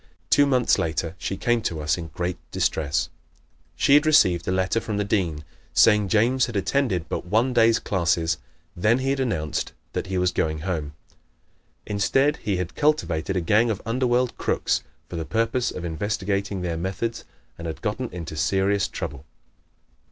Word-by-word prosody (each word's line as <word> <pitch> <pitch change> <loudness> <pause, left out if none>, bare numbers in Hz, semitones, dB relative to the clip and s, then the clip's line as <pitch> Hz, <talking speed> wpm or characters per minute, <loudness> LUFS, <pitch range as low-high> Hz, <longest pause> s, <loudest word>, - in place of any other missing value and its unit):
Two 145 0 +6
months 130 -3 +3
later 80 +2 -1
she 95 - -3
came 120 +2 +1
to 85 -7 -2
us 75 0 +1
in 85 -2 -6
great 90 +2 -3
distress. 75 -2 0 0.7
She 140 - +3
had 150 +2 +6
received 95 - +4
a - - +1
letter 95 +4 +1
from 105 -2 -3
the 105 - +1
Dean 90 -7 -1 0.3
saying 105 -2 +5
James 120 +6 +3
had 120 - -7
attended 100 - 0
but - - -4
one 115 +7 +2
day's 115 -1 +5
classes. 85 -4 0 0.4
Then 110 +7 +3
he 135 +1 0
had 140 - -1
announced 95 - -2 0.2
that - - -3
he 95 0 -2
was 90 0 +2
going 80 -3 -1
home. 80 -4 -3 0.9
Instead 135 +9 +2
he 100 -3 -2
had 90 -1 -3
cultivated 95 - 0
a 90 - +1
gang 110 +7 +3
of 105 -3 -1
underworld 125 +1 +1
crooks - - 0 0.3
for 85 - -6
the 80 - -2
purpose 115 +5 0
of 90 - -6
investigating 100 +2 -2
their 85 -2 -2
methods 95 +7 -3 0.4
and 85 - -5
had 80 - -6
gotten 115 +3 -2
into 85 -3 -6
serious 95 +5 +1
trouble. 70 -1 -6
100 Hz, 170 wpm, -24 LUFS, 85-115 Hz, 0.9 s, Two